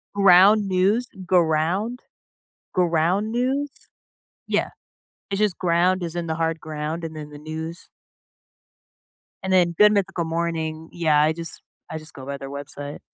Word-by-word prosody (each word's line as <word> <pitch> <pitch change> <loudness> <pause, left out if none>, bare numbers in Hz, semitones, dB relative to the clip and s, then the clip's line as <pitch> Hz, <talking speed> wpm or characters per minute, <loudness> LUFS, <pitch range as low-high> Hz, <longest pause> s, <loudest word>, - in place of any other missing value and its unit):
Right, 200 - -1
Ground 195 +3 +7
News 195 +6 +2 0.2
Ground. 175 +7 +1 0.8
Ground 180 +5 +1
News? 270 +4 0 0.8
Yeah. - - 0 0.6
It's 195 - -1
just 210 -4 +1
ground 180 +1 +2
as 170 -1 -4
in 170 -1 -2
the 160 - -1
hard 165 -1 -1
ground 155 +2 -4
and 160 -1 -6
then 150 -1 -7
the 145 - -10
news? 160 +3 -7 1.6
And 190 - -2
then 175 -2 +3
Good 210 0 +7
Mythical 190 -4 0
Morning. 160 -1 -3
Yeah, 155 -3 +3
I 155 +1 +3
just 165 -1 -7 0.3
I 160 - -3
just 155 0 -12
go 130 -1 -10
by 140 0 -4
their 135 0 -8
website. 145 +1 -7
170 Hz, 150 wpm, -23 LUFS, 155-190 Hz, 1.6 s, Ground